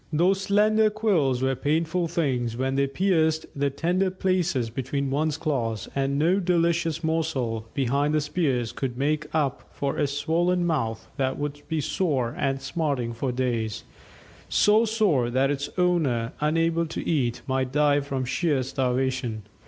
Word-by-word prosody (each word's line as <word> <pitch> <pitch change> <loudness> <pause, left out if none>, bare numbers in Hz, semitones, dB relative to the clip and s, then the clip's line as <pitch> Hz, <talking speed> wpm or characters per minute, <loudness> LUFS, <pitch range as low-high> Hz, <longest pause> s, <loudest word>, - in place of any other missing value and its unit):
Those 180 +5 +2
slender 215 +2 +3
quills 175 - +1
were 135 0 +2
painful 165 +6 0
things 130 -9 -1
when 130 +1 0
they 140 0 +2
pierced 160 0 +1
the 140 0 +1
tender 175 +7 0
places 180 -10 0
between 135 +3 -2
one's 150 +1 0
claws, 120 - -2
and 140 0 0
no 170 +6 +3
delicious 170 -3 +1
morsel 135 -9 -1
behind 140 +3 +1
the - - +3
spears 140 -6 0
could 125 -3 -4
make 150 +3 0
up 150 -4 -1
for 140 -1 -3
a 145 - +2
swollen 170 +5 +1
mouth 125 -10 -1
that 130 -1 0
would 145 0 -4
be 160 -1 -1
sore 135 -8 0
and 135 -1 -1
smarting 135 -6 -1
for 125 +3 -2
days 115 -4 -2 0.7
so 215 +2 +4
sore 200 - +2
that 130 +3 +2
its 140 0 -3
owner, 150 -10 +1
unable 165 +2 +1
to 160 - -5
eat, 125 -7 0
might 130 -1 -1
die 145 0 +3
from 135 -2 -3
sheer 140 0 0
starvation. 125 -3 -1
145 Hz, 155 wpm, -25 LUFS, 130-165 Hz, 0.7 s, so